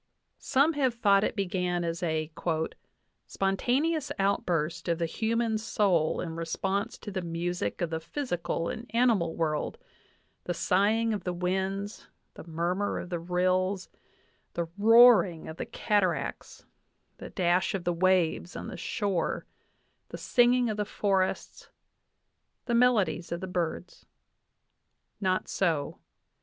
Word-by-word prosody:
Some 285 +4 +2
have 265 -5 +1
thought 200 -3 +4
it - - -1
began 180 -3 -1
as 165 0 -3
a 160 -2 -1 1.0
"spontaneous 270 +10 0
outburst 175 -5 0
of 170 -1 +1
the 170 - 0
human 225 +5 0
soul 200 -7 +1
in 165 -2 -5
re 165 0 -4
sponse 200 +6 -2
to 205 - -6
the 190 -1 -3
music 170 - -3
of 170 -2 -1
the 160 - -1
physical 175 - -3
and 230 0 -6
animal 225 -9 +2
world 155 -2 -1 0.7
the 175 - -2
sighing 215 +6 +2
of 200 -4 -4
the 180 - -2
winds, 190 +3 -2 0.3
the - - -10
murmur 175 +5 -1
of 185 - -6
the 175 - -1
rills, 185 +2 0 0.7
the 170 -1 -1
roaring 220 -5 +6
of 160 - -8
the - - -5
cataracts, 200 -4 -1 0.5
the - - -8
dash 180 +1 +1
of 190 - -4
the 175 0 0
waves 180 -1 +1
on - - -6
the - - -7
shore, 195 +1 -2 0.6
the - - -7
singing 245 0 +3
of 215 -2 -2
the 210 - +1
forests, 195 -2 -1 1.0
the 240 - -1
melodies 210 -10 +2
of 170 - -2
the 190 - -5
birds." 175 -1 -4 1.1
Not 185 -2 0
so. 160 -7 -1
185 Hz, 135 wpm, -28 LUFS, 170-215 Hz, 1.1 s, roaring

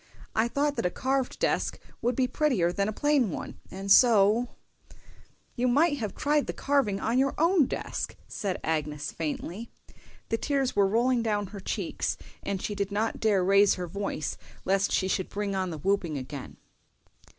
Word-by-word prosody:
I 220 +2 +2
thought 285 +3 0
that - - -1
a - - -1
carved 265 +5 -1
desk - - 0 0.2
would 245 0 +1
be 255 0 +2
prettier 250 - +1
than 200 +2 0
a - - -1
plain 285 -1 +2
one, - - -6
and 195 +1 -4
so"— 225 +1 +6 1.1
"You 250 0 +1
might 290 +4 +3
have 215 -5 -4
tried 295 0 +1
the - - -2
carving 270 -9 +1
on 235 +5 +1
your 275 0 +1
own 330 -3 +4
desk," - - -4
said 195 -4 -3
Agnes, 150 -2 -2
faintly. 170 +7 -4 0.6
The 225 - 0
tears 275 -3 0
were 200 -1 +4
rolling 240 +4 +2
down 210 -2 0
her 200 - -6
cheeks, 190 - -2 0.2
and 200 -1 -3
she 205 - -3
dared 200 0 -2
not 220 +3 -1
raise 200 -1 +4
her 180 - -4
voice 175 -4 -3 0.3
lest 195 +1 +2
she 190 - +1
should 190 -1 -1
bring 205 -1 -2
on 185 -1 -1
the 160 - -5
whooping 175 -2 0
again. 135 +1 -7
205 Hz, 175 wpm, -28 LUFS, 190-255 Hz, 1.1 s, so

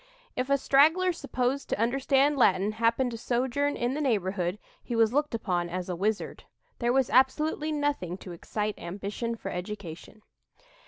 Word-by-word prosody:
If 255 +2 -2
a 280 - +4
straggler 320 +7 +4
supposed 260 -3 -2
to - - -1
understand 270 +4 +2
Latin 200 -5 +3
happened 230 +3 +1
to 230 - -6
sojourn 260 +4 0
in 245 +1 0
the 300 - -2
neighborhood, 190 -7 0 0.3
he 240 - -4
was 225 0 +3
looked 295 -3 +1
upon 175 -6 -1
as 180 +1 -4
a 180 - -1
wizard. 210 +4 -2 0.3
There 240 0 +1
was 265 -1 +2
absolutely 300 +4 +2
nothing 290 - -1
to 190 - -10
excite 210 +5 -3
ambition 205 +6 -4
for 195 -3 -6
education." 190 +1 -7
235 Hz, 160 wpm, -28 LUFS, 195-275 Hz, 0.3 s, a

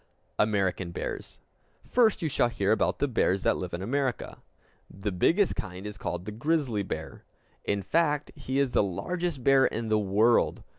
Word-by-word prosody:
American 95 -4 +1
Bears 85 - -6 0.5
First 225 -6 +3
you - - +1
shall 135 -4 +2
hear 100 -4 0
about 110 - +1
the 145 - +1
bears 100 -6 +1
that - - +3
live 90 -1 -5
in 85 +2 -4
America. 130 +2 -2 0.5
The 100 +1 -4
biggest 170 - +2
kind 95 0 -6
is 105 0 -7
called 90 +1 -4
the 105 - -5
grizzly 125 -2 0
bear. 100 - -6 0.4
In 100 -1 -1
fact, 150 - +1
he 135 -2 -4
is 140 -3 +1
the - - +4
largest 155 - -3
bear 135 0 +5
in 115 -1 -4
the 110 0 +3
world. 105 +4 +2
110 Hz, 170 wpm, -28 LUFS, 100-145 Hz, 0.5 s, bear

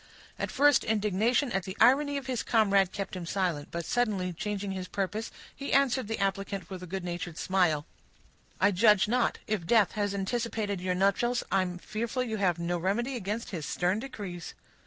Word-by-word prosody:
At - - -2
first, 290 +2 +4
indignation 220 +5 +1
at 195 - 0
the 190 +3 -7
irony 280 +4 +5
of 275 - -5
his 255 -3 -1
comrade 200 -4 +3
kept 195 -1 -5
him 175 -2 -5
silent; 175 -6 -1
but, 170 -1 -4
suddenly 205 -7 0
changing 200 +2 -3
his 185 -1 -4
purpose, 205 +4 -3 0.3
he 280 - -5
answered 265 -4 +3
the 225 - -2
applicant 195 -1 -2
with 185 -1 -6
a 180 - -7
good 190 +1 -4
natured 175 -1 -5
smile,— 175 -6 +1 0.7
"I 200 +3 +4
judge 210 +1 +5
not. 245 +2 +1
If 205 -6 -2
death 220 -2 +4
has 205 -2 -1
anticipated 205 -1 -2
your 180 0 0
nuptials, 200 +6 +2
I 195 - +4
am 180 -1 -3
fearful 225 +6 -3
you 220 -3 -3
have 180 -4 +2
no 170 +1 -1
remedy 235 +9 -1
against 215 +1 -4
his 160 -7 -4
stern 180 +4 0
decrees." 200 -9 -7
200 Hz, 185 wpm, -29 LUFS, 185-230 Hz, 0.7 s, irony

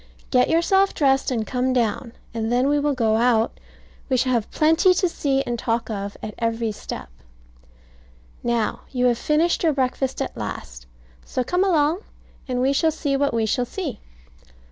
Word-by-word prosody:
Get 250 -1 +4
yourself 385 +4 +3
dressed 270 -2 +2
and 230 -4 -1
come 255 +1 0
down, 235 0 -1 0.2
and 225 0 -2
then 250 +2 +2
we 290 +1 +2
will 290 -1 0
go 220 -3 +2
out; 230 -1 +2 0.5
we 260 - +2
shall 255 +1 +1
have 235 -4 0
plenty 325 +4 +4
to 365 - +2
see 275 -5 0
and 240 -2 -3
talk 230 0 -1
of 200 -1 -5
at 215 - -5
every 230 -1 -1
step. 205 - -7 1.3
Now, 235 -2 -1
you 250 -1 0
have 240 -2 +2
finished 320 +3 +1
your 320 -3 +3
breakfast 265 0 -1
at 270 - -3
last, 60 - -7 0.4
so 255 - -2
come 360 +9 +1
along, 325 -2 +2 0.5
and 250 -1 -1
we 270 +2 +2
shall 320 +3 +3
see 295 -3 -1
what 280 +1 +1
we 230 -1 0
shall 245 +3 0
see. 285 - -5
255 Hz, 175 wpm, -23 LUFS, 230-295 Hz, 1.3 s, Get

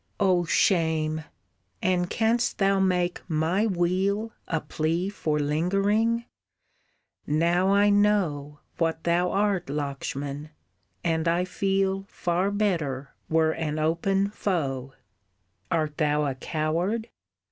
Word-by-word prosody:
"Oh 185 -3 +3
shame! 160 -3 +1 0.5
And 180 -1 +1
canst 230 +2 +1
thou 195 -1 +3
make 180 -2 +1
my 165 +7 +1
weal 195 +4 0 0.2
A 165 - 0
plea 165 +5 -1
for 155 -7 -1
lingering! 195 +10 +1 1.0
Now 170 +5 +2
I 205 +1 +4
know 175 -9 +1 0.2
What 165 -1 0
thou 175 +1 +2
art 195 -2 +1
Lakshman! 140 0 -4 0.5
And 165 -1 0
I 170 +2 +2
feel 195 +1 0
Far 180 +3 0
better 165 -10 -1 0.2
were 160 0 +3
an 155 -2 -3
open 190 +6 +1
foe. 135 -11 -2 0.7
Art 155 -3 -1
thou 150 -1 +2
a 140 - -1
coward? 165 - -1
175 Hz, 110 wpm, -26 LUFS, 155-195 Hz, 1.0 s, I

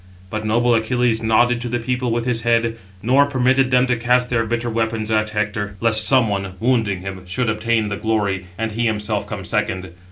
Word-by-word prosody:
But 110 0 -3
noble 120 +3 +2
Achilles 115 0 +1
nodded 120 +2 +2
to 120 - -4
the 120 - -1
people 125 +1 -2
with 115 0 -1
his 120 -2 0
head, 115 -1 +1 0.3
nor 135 +5 +4
permitted 130 -1 +2
them 125 0 +4
to 125 -1 +1
cast 125 +1 +1
their 115 -2 +1
bitter 120 +1 -2
weapons 110 -1 -2
at 110 0 +1
Hector, 105 -1 -3
lest 110 -2 +5
some 130 -4 +4
one, 95 -2 -3
wounding 110 -6 0
him, 95 -1 -7
should 110 +5 -1
obtain 110 0 0
the 105 - -3
glory, 100 -4 -1
and 115 0 -2
he 115 +2 0
himself 105 -1 -2
come - - -6
second. 95 -2 -2
115 Hz, 200 wpm, -20 LUFS, 105-120 Hz, 0.3 s, lest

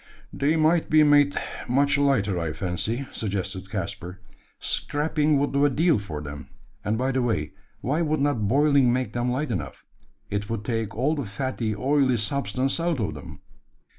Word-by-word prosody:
"They 145 +3 +1
might 160 +1 +2
be 155 0 +6
made 145 -1 +4 0.3
much 140 +3 +3
lighter, 130 -10 +2
I 80 -2 -2
fancy," 95 - -2
suggested 95 -2 -4
Caspar: 90 0 -5 0.4
"scraping 150 0 0
would 140 0 0
do 140 +1 +2
a 145 - +5
deal 160 +1 +2
for 75 -7 -6
them; 70 -1 -8 0.3
and 110 +2 0
by 130 +3 0
the 130 0 0
way, 110 -11 -1 0.3
why 150 +6 0
would 155 -2 0
not 135 -7 +1
boiling 140 0 +4
make 125 -3 -1
them 120 +1 0
light 135 +3 -1
enough? 75 -10 -5 0.5
It 105 +1 -2
would 115 -2 -3
take 115 -3 -2
all 135 +6 +2
the 145 -5 -3
fatty, 110 +1 -3
oily 130 +1 +2
substance 130 +4 -1
out 165 -4 0
of 100 -8 -1
them." 75 - -10
130 Hz, 170 wpm, -25 LUFS, 105-145 Hz, 0.5 s, be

